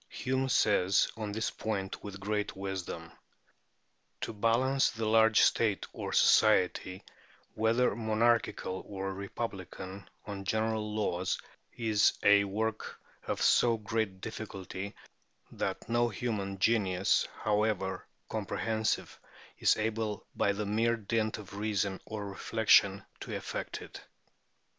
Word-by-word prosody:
Hume 130 +1 -1
says 100 -5 +3
on 110 -2 -4
this 110 +2 -1
point 100 -3 -4
with 100 -1 -7
great 105 +1 -2
wisdom, 95 -4 -5 1.1
"To - - -3
balance 120 +5 +2
the 110 0 -4
large 110 0 +5
state 105 -4 +2
or - - -5
society, 95 -3 +3 0.5
whether 115 +1 +2
monarchical 110 -3 +1
or 95 -1 -4
republican, 95 -2 -6 0.2
on 100 -1 -6
general 110 +1 -1
laws, 95 -3 -1 0.4
is 110 -3 +3
a 100 0 +6
work 110 +2 -3 0.3
of - - -1
so 115 -1 +4
great 105 -3 -2
difficulty, 100 -3 -6 0.6
that - - -3
no 120 0 +2
human 100 -3 -3
genius, 95 -3 +2 0.2
however 105 -3 0 0.2
comprehensive, 110 -1 -2 0.4
is - - +4
able 110 -1 -2
by 100 - +2
the 105 +1 -3
mere 115 +3 +2
dint 110 0 -1
of 100 -2 -10
reason 100 -2 -1
or 105 -2 -5
reflection 100 -1 +3
to - - -5
effect - - -5
it. - - -10
105 Hz, 115 wpm, -31 LUFS, 100-110 Hz, 1.1 s, a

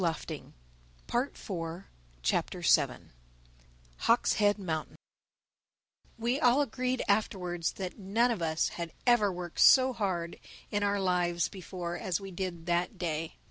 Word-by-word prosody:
THE 170 -2 +2 0.9
SEVENTH 185 -9 -3 0.4
CHAPTER - - 0 1.3
HAWK'S 235 +1 +3
HEAD 205 -1 +3
MOUNTAIN 160 -6 -4 1.2
WE 240 +4 0
all 255 -1 +5
agreed 255 0 -1
afterwards 180 -5 0
that 190 +2 -6
none 225 +5 +2
of 220 -7 -2
us 160 -1 +1
had 170 -2 -6
ever 240 -5 +4
worked 175 -2 -6
so 260 -1 +7
hard 185 -7 -2 0.3
in 205 - 0
our 205 0 +1
lives 175 -2 +1
before 180 -2 -6
as 180 -1 -1
we 195 -1 -8
did 175 -2 -4
that 175 +4 0
day. 165 -2 -3
190 Hz, 125 wpm, -30 LUFS, 175-220 Hz, 1.3 s, so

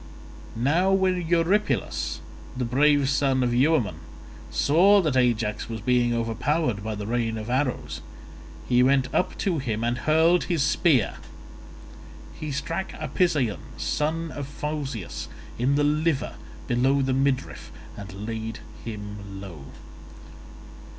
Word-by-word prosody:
Now 160 +11 +2
when 185 -3 +1
Eurypylus 170 - +1 0.4
the 125 - -1
brave 140 +3 +3
son 135 -2 +2
of 120 -1 +1
Euaemon 125 - +2 0.5
saw 190 +8 +5
that 155 -8 0
Ajax 115 -5 +1
was 115 -1 -4
being 120 +2 +2
overpowered 115 +1 0
by 110 0 -3
the 105 0 -5
rain 115 0 -1
of 110 +2 -5
arrows, 125 - -1 0.7
he 125 -1 +4
went 130 0 +3
up - - 0
to 175 -6 0
him 115 -4 -2
and 120 +2 0
hurled 160 +5 +3
his 165 -6 +1
spear. 150 - +2 1.2
He 155 -1 -6
struck 165 +7 -3
Apisaon 145 - 0 0.2
son 160 +2 -1
of 140 -2 -5
Phausius 145 - -5 0.3
in 130 +4 +2
the 145 - +2
liver 150 0 +1 0.3
below 135 +3 +2
the 130 0 0
midriff, 135 0 -1 0.2
and 100 0 -8
laid 115 0 -4 0.3
him 105 -3 -7
low. 85 -8 -9
130 Hz, 125 wpm, -25 LUFS, 115-155 Hz, 1.2 s, saw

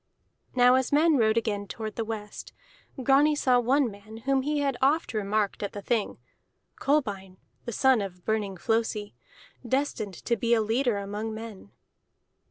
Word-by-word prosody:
Now 250 0 +6
as 260 0 +1
men 305 +1 +4
rode 220 -2 +3
again 205 -3 -1
toward 215 +1 -6
the 230 - -2
west, 215 -2 -7 0.5
Grani 285 +3 +4
saw 255 -3 +3
one 255 +1 +2
man 205 +2 -12
whom 270 -1 +2
he 295 +2 -1
had 275 -2 0
oft 285 +2 +2
remarked 210 -1 -1
at 205 - -4
the 205 - -6
Thing: 230 -2 -1 0.6
Kolbein 200 -10 -1 0.3
the 235 - -4
son 260 -1 +3
of 180 -3 -7
Burning 210 -3 -1
Flosi, 225 +1 -1 0.5
destined 240 -6 -2
to 235 - +2
be 235 +2 +2
a 225 - +2
leader 230 +1 +1
among 210 +2 -4
men. 220 - -9
225 Hz, 160 wpm, -27 LUFS, 210-265 Hz, 0.6 s, Now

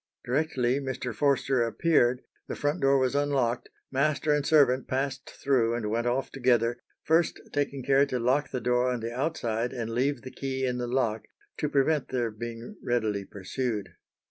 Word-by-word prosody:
Directly 130 -1 +1
Mr. 130 -3 -4
Forster 135 -2 +2
appeared, 125 0 +2 0.2
the - - -4
front 145 +4 -1
door 135 0 +4
was 130 -1 +1
unlocked, 140 -4 0 0.2
master 150 +2 +1
and 150 -1 +1
servant 140 -4 +4
passed 135 +1 -2
through 120 -4 +1
and 110 -3 -2
went 115 +2 0
off 130 +3 -1
together, 120 -2 +2 0.2
first 160 +2 +2
taking 140 -2 -1
care 140 +2 +4
to 130 - -2
lock 130 +5 +1
the 125 - -3
door 125 +1 +2
on 125 -2 -2
the 115 +1 -4
outside 125 -5 -1
and 115 -3 -4
leave 130 +2 0
the 130 - -8
key 130 -1 -3
in 125 -1 -1
the 120 - -2
lock 120 -3 0 0.3
to 150 - -1
prevent 145 +1 +2
their 120 -3 -1
being 115 - -7
readily 110 -5 -1
pursued. 105 +1 -3
130 Hz, 170 wpm, -28 LUFS, 120-140 Hz, 0.3 s, door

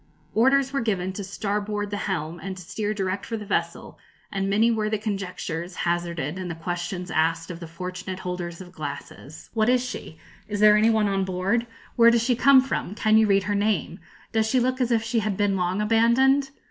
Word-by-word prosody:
Orders 265 +4 +3
were 275 - 0
given 190 -5 -1
to 200 - -5
starboard 205 +1 -3
the 205 - -2
helm, 170 -4 -3
and 190 -1 -6
to 185 - -9
steer 210 +5 -3
direct 195 -2 -2
for 230 - -4
the 210 - -7
vessel; - - -3 0.3
and 195 0 -1
many 220 +4 +3
were 215 -2 0
the 215 - 0
conjectures 185 -4 -4
hazarded, 170 -2 -2
and 185 -1 -4
the 170 - -4
questions 175 +1 -4
asked 165 +2 0
of 170 - -8
the 170 - -8
fortunate 180 +2 -6
holders 180 -1 -5
of 180 -1 -11
glasses. 145 -1 -8
'What 220 0 +2
is 250 0 +3
she?' 160 -9 -7 0.3
'Is 205 -1 -3
there 210 0 +7
any 215 +2 +4
one 220 -2 +3
on 195 -1 0
board?' 190 +6 0 0.3
'Where 235 -1 +8
does 235 -1 +3
she 245 0 +2
come 265 +2 +6
from?' 255 -6 -3
'Can 215 0 +4
you 220 - +4
read 195 -1 +3
her 205 +1 -1
name?' 200 -4 0 0.3
'Does 220 -1 +1
she 255 - +3
look 255 +1 0
as 245 - +1
if 225 -1 +2
she 230 +1 0
had 210 -3 -2
been 205 -1 +2
long 185 +2 0
abandoned?' 245 +5 +3
200 Hz, 210 wpm, -25 LUFS, 180-225 Hz, 0.3 s, Where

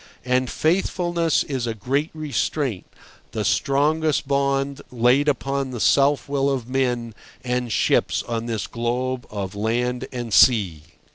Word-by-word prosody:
And 125 0 +1
faithfulness 170 -1 +1
is 130 -4 -3
a 115 - -2
great 135 +8 -1
restraint, 140 - -2 0.5
the 105 -2 -2
strongest 150 +5 +1
bond 140 0 0
laid 125 +4 +3
upon 135 -1 0
the 125 -2 -6
self 140 +4 +3
will 140 0 +1
of 130 -4 -2
men 125 -3 -1 0.3
and 125 -1 -2
ships - - +1
on 115 0 -3
this 110 -3 -2
globe 125 +2 -2
of 100 -3 -5
land 120 +4 -1
and 120 -4 -5
sea. 95 - +4
130 Hz, 135 wpm, -23 LUFS, 120-140 Hz, 0.5 s, sea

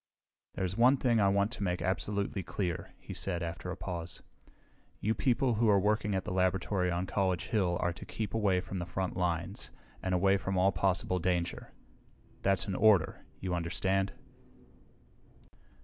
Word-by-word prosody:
"There's 95 0 -2
one 125 +5 +5
thing 120 -3 +2
I 100 - +4
want 100 +2 +2
to 105 - -4
make 90 -2 0
absolutely 100 +2 -1
clear," 90 -1 -4
he - - -9
said 90 -3 -1
after 85 +2 -5
a 95 - -4
pause. 85 -2 -6 0.8
"You 110 - +1
people 125 0 +2
who 110 0 +2
are 100 -1 +5
working 105 0 +1
at 95 - -2
the - - -4
laboratory 95 0 +1
on 90 +1 -1
College 95 -2 -1
Hill 90 -5 +1
are 85 -1 0
to 85 - -10
keep 110 -2 -4
away 100 -5 +2
from 95 0 -5
the 85 - -4
front 95 +1 -3
lines 90 +1 -2 0.3
and 95 -1 0
away 95 +2 +4
from 95 -1 -2
all 95 +2 +4
possible 90 0 +1
danger. 90 0 -1 0.7
That's 95 -1 +2
an 100 - -3
order, 100 -4 +3 0.2
you 95 -1 -2
understand?" 95 +3 0
95 Hz, 165 wpm, -31 LUFS, 90-100 Hz, 0.8 s, one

